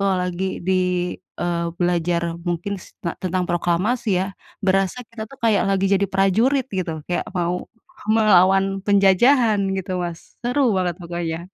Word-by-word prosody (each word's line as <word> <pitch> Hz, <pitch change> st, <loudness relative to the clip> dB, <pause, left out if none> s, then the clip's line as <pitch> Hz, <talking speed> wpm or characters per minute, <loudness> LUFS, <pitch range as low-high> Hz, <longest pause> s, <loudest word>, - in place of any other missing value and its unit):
kalau 195 Hz, -1 st, +2 dB
lagi 180 Hz, +1 st, -3 dB
di, 180 Hz, -1 st, +1 dB, 0.3 s
eee, 170 Hz, -1 st, -1 dB
belajar 170 Hz, -1 st, 0 dB
mungkin 175 Hz, +4 st, -2 dB
s -, -, -16 dB
te 170 Hz, -, -2 dB
tentang 185 Hz, 0 st, -1 dB
proklamasi 185 Hz, +8 st, 0 dB, 0.2 s
ya, -, -, -4 dB, 0.4 s
berasa 195 Hz, +4 st, +1 dB
kita 230 Hz, -2 st, -7 dB
itu 275 Hz, -, -14 dB
kayak 215 Hz, -3 st, +3 dB
lagi 195 Hz, 0 st, +2 dB
jadi 200 Hz, +1 st, +2 dB
prajurit 225 Hz, +8 st, +2 dB
gitu. 170 Hz, -5 st, -3 dB
Kayak 175 Hz, -, -1 dB
mau 175 Hz, 0 st, -1 dB, 0.4 s
melawan 195 Hz, -2 st, +4 dB
penjajahan 205 Hz, +4 st, +4 dB, 0.2 s
gitu, 185 Hz, -1 st, -3 dB
Mas. 170 Hz, -1 st, -8 dB
Seru 250 Hz, 0 st, +2 dB
banget 180 Hz, -2 st, 0 dB
pokoknya. 170 Hz, -1 st, -3 dB
185 Hz, 145 wpm, -22 LUFS, 175-200 Hz, 0.4 s, melawan